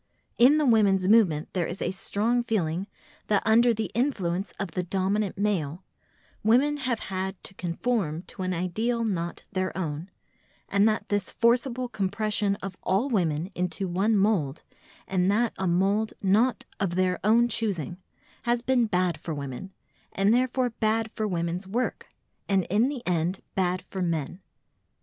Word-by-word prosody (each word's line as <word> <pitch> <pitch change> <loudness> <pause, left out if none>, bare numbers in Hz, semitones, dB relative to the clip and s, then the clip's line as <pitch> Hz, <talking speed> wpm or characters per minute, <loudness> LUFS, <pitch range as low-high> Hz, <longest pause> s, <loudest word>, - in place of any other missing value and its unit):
In 265 +6 +7
the 305 - +2
women's 200 -6 +4
movement 190 -8 +4
there 180 -3 0
is 175 - -6
a - - -1
strong 210 +5 0
feeling 190 -5 -1 0.4
that 205 -2 +2
under 235 +2 +5
the 220 -1 -2
influence 195 -7 -1
of 195 -4 -3
the 180 - -1
dominant 195 +3 -1
male, 185 -5 -1 0.6
women 260 +7 +4
have 255 -5 -2
had 190 0 -3
to - - -5
conform 175 -2 -2
to - - -8
an 185 0 -1
ideal 215 +7 -1
not 175 -6 -2
their 185 -1 -2
own, 165 0 -4 0.6
and 200 +2 +4
that 215 - -2
this 205 -2 0
forcible 250 +1 +1
compression 205 -2 0
of 195 -1 -5
all 205 +9 +1
women 170 -3 0
into 180 +2 -2
one 200 +5 +2
mould—and 185 0 -1
that 230 +2 +1
a 190 - 0
mould 195 +5 +1
not 215 +6 +2
of 190 -4 -1
their 185 0 +1
own 230 +3 +5
choosing—has 220 - -3
been 250 -3 +2
bad 180 -5 0
for 160 0 -4
women, 140 +7 -6 0.4
and 195 +3 +3
therefore 255 0 +1
bad 220 0 0
for 215 -1 -2
women's 175 0 -2
work, 240 +6 -2 0.4
and 195 -2 +3
in 215 +5 +4
the 270 -4 -6
end 175 +1 0
bad 185 -1 0
for 190 - -6
men. 170 +1 -2
195 Hz, 155 wpm, -27 LUFS, 180-225 Hz, 0.6 s, In